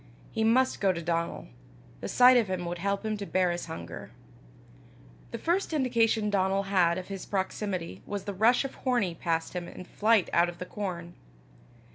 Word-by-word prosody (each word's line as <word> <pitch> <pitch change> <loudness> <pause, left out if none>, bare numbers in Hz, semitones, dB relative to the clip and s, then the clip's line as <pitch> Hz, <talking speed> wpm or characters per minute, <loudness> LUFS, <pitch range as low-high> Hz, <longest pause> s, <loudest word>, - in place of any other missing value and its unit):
He 220 - -1
must 255 +4 +3
go 195 -2 +4
to 170 - -4
Donal. 170 0 -2 0.5
The - - -5
sight 250 +1 +6
of 235 -4 +3
him 185 -2 -3
would 175 0 -4
help 200 +3 -1
him 215 -1 -1
to 200 - -5
bear 185 -1 +2
his 175 0 -4
hunger. 160 - -7 1.2
The - - -5
first 345 +1 0
indication 230 -6 +2
Donal 195 0 +1
had 170 -2 +4
of 185 +1 -6
his 195 -1 -6
proximity 190 -2 -3
was 205 -2 -4
the 200 - -4
rush 230 +7 +3
of 270 - -7
Hornie 230 -10 0
past 165 -1 -1
him 175 -1 -4
in 180 - -9
flight 215 -1 +2
out 170 +1 +4
of 175 - -9
the 180 - -6
corn. 175 -3 -5
195 Hz, 185 wpm, -28 LUFS, 175-225 Hz, 1.2 s, sight